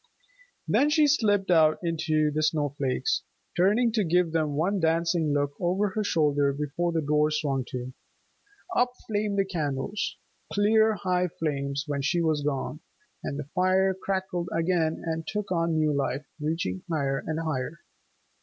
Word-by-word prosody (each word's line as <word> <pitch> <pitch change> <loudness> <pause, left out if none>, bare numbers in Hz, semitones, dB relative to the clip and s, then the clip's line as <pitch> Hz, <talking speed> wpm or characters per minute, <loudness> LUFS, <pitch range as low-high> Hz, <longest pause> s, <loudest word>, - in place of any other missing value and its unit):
Then 290 - +3
she 300 0 +4
slipped 205 -9 +2
out 155 -2 +5
into 155 -2 +1
the 155 +1 -1
snow 155 -1 +1
flakes, 140 - 0 0.3
turning 210 +7 +3
to 220 -2 +1
give 175 -1 +2
them 155 -3 0
one 185 +7 +1
dancing 165 -1 +1
look 145 0 +1
over 185 +4 +1
her 215 +3 -2
shoulder 145 -6 +2
before 150 +5 -2
the 165 -2 0
door 150 +1 +2
swung 140 -4 -1
to. 125 0 -5 0.8
Up 250 -5 +3
flamed 210 -1 -1
the 195 - +3
candles, 160 +1 -2 0.3
clear 220 +1 +4
high 180 -1 0
flames 140 -4 -2
when 145 -2 -2
she 170 +5 +1
was 160 -3 +1
gone, 145 -2 -2 0.4
and 140 - -3
the 150 - -4
fire 190 +1 +3
crackled 190 -2 -3
again, 165 -1 0
and 160 -1 -3
took 210 -2 -3
on 165 -2 +1
new 155 -1 +2
life, 140 +1 -1
reaching 165 +5 -2
higher 140 -4 0
and 160 0 -3
higher. 155 0 -3
165 Hz, 155 wpm, -27 LUFS, 150-190 Hz, 0.8 s, out